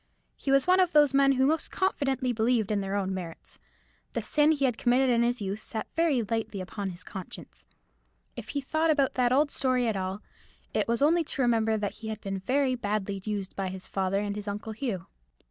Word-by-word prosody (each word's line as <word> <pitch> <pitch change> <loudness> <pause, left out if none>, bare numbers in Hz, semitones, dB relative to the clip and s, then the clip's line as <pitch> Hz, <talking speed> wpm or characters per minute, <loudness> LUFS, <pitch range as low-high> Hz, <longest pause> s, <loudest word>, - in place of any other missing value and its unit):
He - - -6
was 275 0 +4
one 370 +1 +4
of 365 -2 +3
those 295 -3 +5
men 275 0 +5
who 265 0 +2
most 315 +3 +1
confidently 270 -9 0
believe 225 -1 +1
in 205 -1 +1
their 195 0 -3
own 195 -1 -1
merits. 175 -3 -8 0.5
The - - -2
sin 300 +1 +3
he 285 -3 +1
had 250 -3 +1
committed 250 +2 +3
in 235 -1 +3
his 240 -2 0
youth 195 +2 -3
sat 220 0 -5
very 315 -8 +2
lightly 220 -1 -3
upon 195 +2 -4
his 180 0 -9
conscience. 190 -1 -10 0.7
If - - -8
he 285 - -2
thought 315 +4 0
about 285 -4 +2
that 245 -1 +2
old 285 +3 +3
story 255 -2 +1
at 220 - 0
all, 190 +2 -3 0.5
it - - +1
was 235 +3 +1
only 330 +3 +4
to 275 - -1
remember 225 -2 +2
that 205 -1 -2
he 220 - -6
had 220 -1 -4
been 195 -2 -4
very 260 +6 +1
badly 205 -4 -2
used 205 -2 -4
by 195 -1 -2
his 185 0 -6
father 195 0 -1
and 205 0 -2
his 210 0 -6
Uncle 210 +2 -4
Hugh. 215 -7 -3
230 Hz, 215 wpm, -28 LUFS, 200-275 Hz, 0.7 s, those